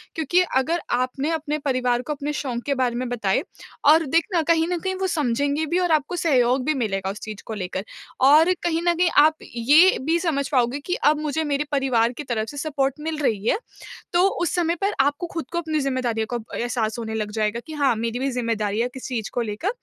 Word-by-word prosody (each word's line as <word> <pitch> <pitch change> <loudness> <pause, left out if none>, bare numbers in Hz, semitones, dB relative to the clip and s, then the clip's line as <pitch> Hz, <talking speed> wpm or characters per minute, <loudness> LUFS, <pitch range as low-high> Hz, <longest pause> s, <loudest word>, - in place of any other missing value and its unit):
क्योंकि 320 +3 +2
अगर 315 +7 +1
आपने 255 +4 0
अपने 305 -2 -2
परिवार 255 -4 0
को 300 +4 -4
अपने 290 +1 -4
शौक 250 -5 -3
के 285 - +1
बारे 250 -2 0
में 250 +1 -2
बताएँ, 210 -6 0 0.4
और 315 +2 +6
देखना 335 +5 +1
कहीं 325 +1 +2
न 355 0 -1
कहीं 375 +2 -2
वो 380 0 -1
समझेंगे 285 -1 0
भी 340 +4 0
और 355 -2 +1
आपको 310 +2 +1
सहयोग 260 -6 +2
भी 310 - +2
मिलेगा 195 -7 -2
उस 205 - -9
चीज़ 215 -2 -7
को 225 - -5
लेकर। 190 -1 -4 0.4
और 310 +7 +6
कहीं 330 -1 0
न 345 - +5
कहीं 350 0 +3 0.2
आप 315 0 +3 0.2
ये 295 +11 +5
भी 325 +3 +2
समझ 300 -6 -1
पाओगे 255 0 +1
कि 360 - -1
अब 300 +1 +2
मुझे 305 +1 -1
मेरे 290 -1 0
परिवार 250 -4 +2
की 295 - -7
तरफ 225 -4 -2
से 290 - -9
सपोर्ट 275 -3 -1
मिल 315 0 -3
रही 225 -8 -1
है। - - +3 0.6
तो 355 +2 +5
उस 345 - 0
समय 340 -1 +1
पर 400 +1 +1
आपको 290 +6 +1
खुद 330 - -3
को 340 - -3
अपनी 315 -2 -1
ज़िम्मेदारियों 255 -5 -1
का - - +1 0.2
एहसास 235 -2 -1
होने 220 -1 -4
लग 210 -1 -3
जाएगा 215 +1 -1
कि 315 - -7
हाँ, 275 -5 +2
मेरी 230 +2 -2
भी 270 +1 0
ज़िम्मेदारियाँ 230 -3 -1
है - - -3
किस 260 - -7
चीज़ 230 -5 -3
को 245 - 0
लेकर। 220 - -2
275 Hz, 225 wpm, -23 LUFS, 240-320 Hz, 0.6 s, और